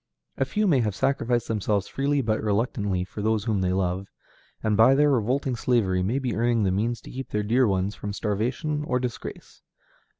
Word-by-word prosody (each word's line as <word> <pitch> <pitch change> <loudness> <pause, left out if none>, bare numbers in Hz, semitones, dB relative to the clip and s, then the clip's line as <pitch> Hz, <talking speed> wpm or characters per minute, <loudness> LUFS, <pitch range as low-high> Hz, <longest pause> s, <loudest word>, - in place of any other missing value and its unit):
A - - 0
few 215 0 0
may 155 -9 +4
have 105 -5 0
sacrificed 120 -1 0
themselves 105 -2 0
freely 140 +1 0
but 110 -1 0
reluctantly 105 -3 0
for 95 +3 -7
those 110 0 +1
whom 105 -4 0
they 90 -1 +1
love, 95 +1 -1 0.6
and 110 -1 +2
by 115 +5 +6
their 145 +1 +4
revolting 130 +2 0
slavery 110 -6 +1
may 105 +8 0
be 130 -4 -2
earning 115 -1 +2
the 95 - +2
means 115 +5 -1
to - - -11
keep 135 +1 -6
their 105 0 -1
dear 120 +4 +3
ones 95 0 0
from 105 - -6
starvation 120 +9 -2
or 125 -3 0
disgrace. 125 -2 -6
110 Hz, 195 wpm, -25 LUFS, 100-130 Hz, 0.6 s, by